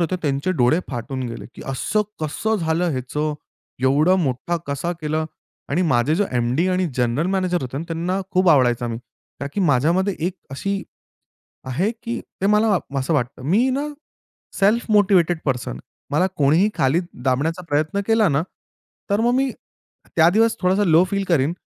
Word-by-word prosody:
होते, 175 +2 0
त्यांचे 145 +5 0
डोळे 150 +3 +3
फाटून 130 +2 -4
गेले, 115 - -7
की - - -10
"असं 165 - 0 0.2
कसं 215 +9 -1
झालं 165 0 0
ह्याचं, 150 +3 -2 0.5
एवढं 150 +8 +4
मोठा 135 +7 -1
कसा 140 +5 -2
केला" 155 0 -1 0.4
आणि 175 +6 +1
माझे 140 -1 +2
जे 205 +4 +2
एमडी 125 +9 +1
आणि 185 0 +1
जनरल 125 +6 +1
मॅनेजर 185 -4 0
होते 130 +2 -4
ना, 165 - -4
त्यांना 175 +4 -1
खूप 185 0 +3
आवडायचा 125 -5 +3
मी. 115 0 -4 0.4
का 140 - -3
की 205 - -2
माझ्यामध्ये 170 +6 +2
एक 185 - -2 0.2
अशी 195 +8 -2 0.9
आहे 180 - 0
की 235 0 -3 0.2
ते - - +1
मला 210 -1 +4 0.2
असं 135 +5 -1
वाटतं. 135 -2 -1
मी 215 - +2
ना, 285 +3 -1 0.7
सेल्फ 210 +4 +3
मोटिवेटेड 185 -5 +4
पर्सन. 125 - -1
आहे. 60 - -7 0.3
मला 180 +6 +3
कोणीही 155 +9 +4
खाली 135 +6 +3 0.2
दाबण्याचा 145 +7 0
प्रयत्न 155 +7 0
केला 225 -2 +4
ना, 140 +3 +1 0.7
तर 200 +2 +2
मग 240 +1 +2
मी 270 0 +1 0.6
त्या 165 +1 +6
दिवस 225 +4 +3
थोडासा 190 +3 +2
लो 165 +1 +5
फील 200 0 0
करीन. 155 0 +2
165 Hz, 165 wpm, -21 LUFS, 140-195 Hz, 0.9 s, त्या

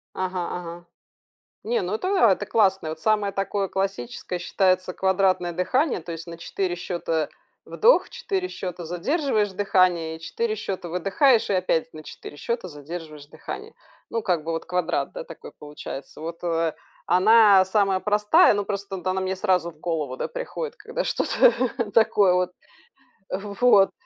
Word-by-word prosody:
Ага, 185 -1 -2
ага, 175 0 -7 0.8
не, 235 +2 0
ну, 185 +2 -2
это 365 +12 -2 0.2
это 190 - +1
классно. 190 -7 +2
Вот 160 0 -7
самое 210 0 +1
такое 195 0 -1
классическое 185 -3 -3
считается 185 0 +1
квадратное 190 -2 +1
дыхание, 250 - 0
то 170 +1 -7
есть 165 +1 -7
на 170 -1 -8
4 175 +1 -3
счёта 170 -3 -2 0.3
вдох, 475 +3 +3
4 390 -6 -3
счёта 180 - -6
задерживаешь 210 - 0
дыхание, 185 -4 +2
и - - -15
4 445 - -2
счёта 185 - -5
выдыхаешь 210 - +3
и 200 - +1
опять 165 -3 -1
на 155 - -9
4 145 -1 -10
счёта 235 +1 -3
задерживаешь 155 -1 -9
дыхание. - - -8 0.4
Ну, 230 - -1
как 180 -4 +1
бы 165 - -2
вот 165 - -3
квадрат, 180 -1 -1
да, - - -6
такой - - -11
получается. 145 -2 -9
Вот, 165 +1 -7
э, 165 -2 0 0.3
она 205 0 +6
самая 195 -1 +1
простая, 210 +1 +4
но 205 0 -1
просто 200 -1 -4
вот 180 - -10
она 185 0 0
мне 190 0 -2
сразу 185 -4 +1
в 155 -2 -23
голову, 155 -7 -2
да, - - -2
приходит, 485 -1 -5
когда 465 +3 -4
что-то 250 - +2
такое 205 -4 +4
вот. 180 0 +1 0.8
В 200 +2 -4
вот 205 -6 +6
185 Hz, 160 wpm, -24 LUFS, 170-210 Hz, 0.8 s, она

